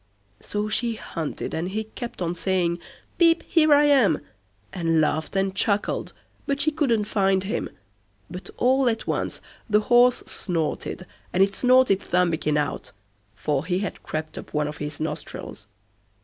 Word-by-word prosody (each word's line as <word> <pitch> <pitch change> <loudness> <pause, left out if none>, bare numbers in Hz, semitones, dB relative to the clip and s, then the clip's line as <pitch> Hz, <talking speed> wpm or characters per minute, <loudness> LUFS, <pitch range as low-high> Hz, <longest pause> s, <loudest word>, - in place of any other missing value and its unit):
So 210 0 -3
she 230 +2 0
hunted, 165 -7 -5
and 170 +3 -2
he 215 +3 -2
kept 220 -2 -6
on 170 0 -1
saying, 175 -1 0 0.4
"Pip, 335 -1 +5
here 310 -2 +4
I 290 0 +7
am", 275 -8 +4 0.5
and 165 -2 +1
laughed 155 +3 0
and 195 0 +1
chuckled, 200 0 0 0.4
but 280 0 0
she 310 +2 +2
couldn't 265 -9 +1
find 195 -2 +1
him; 210 +5 -2 0.6
but 180 +1 -8
all 260 +1 +3
at 225 -1 -2
once - - -2 0.3
the 210 0 +4
horse 245 +2 +4
snorted, 175 +1 -2 0.3
and 185 - +4
it 195 0 +1
snorted 250 -3 +4
Thumbikin 170 -5 +1
out, 145 -3 -3 0.4
for 140 +4 -1
he 180 +2 -1
had - - -6
crept 155 0 -5
up - - -11
one 150 0 +1
of 150 0 -6
his 150 0 -5
nostrils. 155 -1 -6
195 Hz, 155 wpm, -24 LUFS, 165-240 Hz, 0.6 s, I